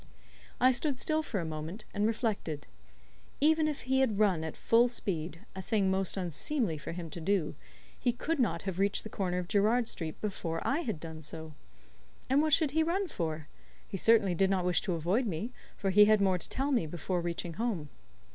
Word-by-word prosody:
I 255 +1 +6
stood 265 +2 +1
still 310 +4 +1
for 235 -9 -3
a 170 - -3
moment, 160 +7 -6
and 205 +1 +1
reflected. 215 - -2 0.7
Even 315 +1 +4
if 300 -2 -3
he 265 +2 +1
had 240 -6 +2
run 195 -6 +3
at 160 - -5
full 235 +2 +4
speed 170 -8 -3
a 190 - -4
thing 195 -1 +1
most 190 0 0
unseemly 185 - -1
for - - -6
him 165 -2 -6
to 170 - -7
do 185 -2 +1 0.5
he 245 - +2
could 295 +6 -2
not 180 -9 +1
have 190 -2 -3
reached 200 +1 +2
the 220 - -8
corner 180 -2 -1
of 180 -1 -3
Gerrard 220 +4 +2
Street 160 -7 -4
before 170 -6 -3
I 275 - +1
had 220 - -3
done 160 -1 -8
so. 160 0 -7 0.8
And 275 +2 +5
what 310 0 +1
should 305 -3 +4
he 320 +3 +2
run 355 +4 0
for? 160 - -3 0.4
He - - -6
certainly 220 -5 +4
did 190 +3 +2
not 190 -2 +1
wish 180 0 +2
to 190 - -2
avoid 185 +10 +1
me, 200 +6 -3 0.3
for 195 -1 0
he 210 +2 +8
had 215 0 +5
more 190 -2 +2
to - - -8
tell 275 +2 -1
me 235 - +2
before 175 +3 -2
reaching 170 0 -3
home. 200 -8 -2
195 Hz, 205 wpm, -31 LUFS, 170-240 Hz, 0.8 s, he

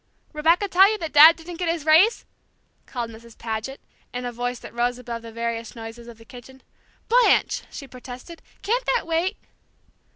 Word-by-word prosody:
"Rebecca 330 +6 +2
tell 385 +2 +5
you 435 - -2
Dad 315 -1 +7
didn't 335 +1 -10
get 350 -1 -2
his 330 -3 -2
raise?" 330 +9 +4 0.6
called 240 -3 -5
Mrs. 225 0 -15
Paget, 225 +4 -5 0.3
in 250 0 -5
a 245 - -3
voice 245 +1 -3
that - - -12
rose 240 +1 -1
above 235 -2 -7
the 230 0 -10
various 230 0 -4
noises 230 +1 -9
of 235 -2 -12
the 225 - -17
kitchen. 260 +2 -14 0.4
"Blanche!" 485 +2 +3
she 275 - -9
protested, 255 +6 -11 0.2
"can't 485 +4 0
that 485 - -1
wait?" 335 +3 -1
255 Hz, 170 wpm, -23 LUFS, 235-335 Hz, 0.6 s, Dad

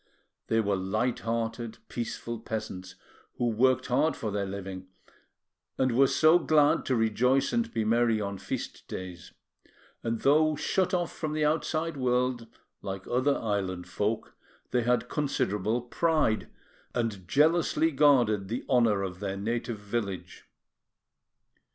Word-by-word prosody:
They 115 - +2
were 100 -3 +1
light 110 +6 -1
hearted, 115 0 -3
peaceful 115 0 -4
peasants, 110 -5 -6 0.4
who 120 - +1
worked 130 +3 +2
hard 145 +6 +2
for 110 - -4
their 100 -1 -2
living, 95 -1 -6 0.9
and 130 +1 +3
so 160 +2 +5
were 175 - -5
glad 150 -2 +3
to 130 - +1
rejoice 125 +4 +2
and 235 -1 0
be 110 - -1
merry 115 0 +3
on 100 -2 -4
feast - - -5
days; 90 -1 -7 0.7
and 115 -1 -2
though 155 +2 +4
shut 185 +5 0
off 175 -2 -2
from 155 -2 -3
the 155 -1 +1
outside 155 +1 0
world, 125 -2 0 0.3
like 95 -1 -5
other 130 +3 +2
island 95 -5 -2
folk, 105 +2 -2 0.4
they 125 - +2
had 125 +1 +1
considerable 115 -6 -1
pride, 155 -3 +1 0.5
and 110 -7 -2
jealously 160 - +3
guarded 125 -9 +3
the 115 +5 -4
honour 115 -6 +3
of 90 -2 -5
their 100 -1 -3
native 115 +2 -2
village. 100 -2 -5
115 Hz, 135 wpm, -28 LUFS, 105-135 Hz, 0.9 s, so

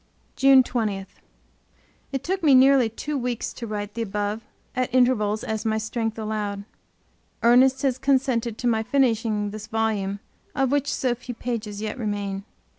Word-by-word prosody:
JUNE 270 -1 +6
20 215 -6 -2 1.1
It 270 -1 -3
took 380 +2 -2
me 290 -5 +6
nearly 260 -2 +6
two 295 +7 -5
weeks 245 -2 -3
to 235 - -7
write 205 -1 -4
the 230 - -4
above 210 0 -2 0.3
at 255 0 -1
intervals 230 -4 +2
as 220 -1 -3
my 220 -1 0
strength 225 0 -3
allowed. 210 -2 -3 0.8
Ernest 255 +3 +5
has 260 -2 +1
consented 260 -4 +1
to 245 - -6
my 225 -2 +2
finishing 225 -5 +1
this 215 0 -8
volume, 215 -3 -1 0.4
of 270 -2 +1
which 285 0 +1
so 255 -2 0
few 245 0 -8
pages 220 -3 -4
yet 215 +4 -4
remain. 200 -3 -3
230 Hz, 155 wpm, -24 LUFS, 210-255 Hz, 1.1 s, JUNE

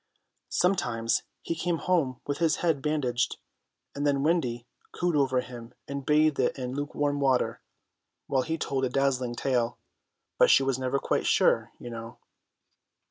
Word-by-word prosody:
Sometimes 120 -12 +1 0.2
he - - -2
came 165 +1 -1
home 160 -9 0
with 145 - -3
his 165 -2 +3
head 160 -5 +2
bandaged, 135 -5 0 0.6
and 140 - -4
then 140 -1 +2
Wendy 125 -8 0 0.3
cooed 175 -1 -1
over 130 -3 +2
him 120 -1 -10
and 140 0 -4
bathed 150 +1 +3
it 130 - +1
in 125 -1 -4
lukewarm 145 0 -1
water, 135 -3 +1 0.6
while 135 -1 +1
he 160 +5 -2
told 135 -4 -2
a 130 - +1
dazzling 130 -2 0
tale. 120 -2 0 0.6
But - - +6
she 135 - +6
was 135 -1 0
never 130 +1 0
quite - - 0
sure, - - +3
you 120 - -8
know. 115 0 -8
135 Hz, 155 wpm, -28 LUFS, 125-150 Hz, 0.6 s, But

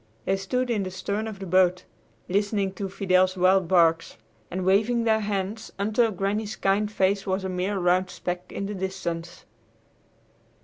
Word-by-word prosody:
They 195 - +2
stood 245 +6 -1
in 215 -3 +1
the 190 - -3
stern 200 +3 -3
of 215 -2 -6
the 195 - -7
boat, 185 0 +3 0.4
listening 200 0 0
to 195 0 -4
Fidel's 185 -1 +2
wild 185 0 +4
barks, 165 -2 +3 0.3
and 185 +1 -3
waving 220 +5 +3
their 220 -1 +3
hands, 205 +1 -3
until 220 +3 +2
Granny's 205 +2 -2
kind 205 +2 +1
face 195 -1 +1
was 190 0 -1
a 190 - -3
mere 185 +2 -1
round 180 0 +2
speck 180 0 -5
in 200 - -4
the 205 - -4
distance. 180 -3 -5
195 Hz, 165 wpm, -25 LUFS, 185-205 Hz, 0.4 s, wild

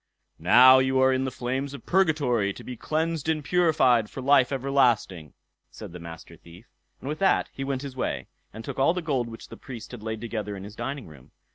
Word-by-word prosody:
"Now 130 +1 +7
you 130 0 +1
are 130 0 +4
in 130 0 0
the - - -1
flames 130 +3 -4
of - - -12
purgatory, 145 - +1
to - - -11
be 125 - -7
cleansed 160 +3 -2
and 155 -2 0
purified 135 -10 +3
for - - -9
life 135 -1 +3
everlasting", 120 - 0 0.3
said - - -10
the 90 - -9
Master 85 -1 -11
Thief; 85 +6 -16 0.3
and - - -9
with 155 +2 -4
that 195 - +2
he 135 - -5
went 135 0 -3
his 135 -2 -7
way, 130 - -3 0.3
and 110 +2 -10
took - - -6
all 165 +6 +3
the 180 - -3
gold 130 -7 -1
which 115 -1 -11
the - - -10
Priest 120 -5 -10
had 125 -3 -9
laid 110 0 -4
together 105 -3 -5
in 95 - -9
his 105 +2 -10
dining 135 +2 -5
room. 75 -6 -16
130 Hz, 220 wpm, -26 LUFS, 110-140 Hz, 0.3 s, Now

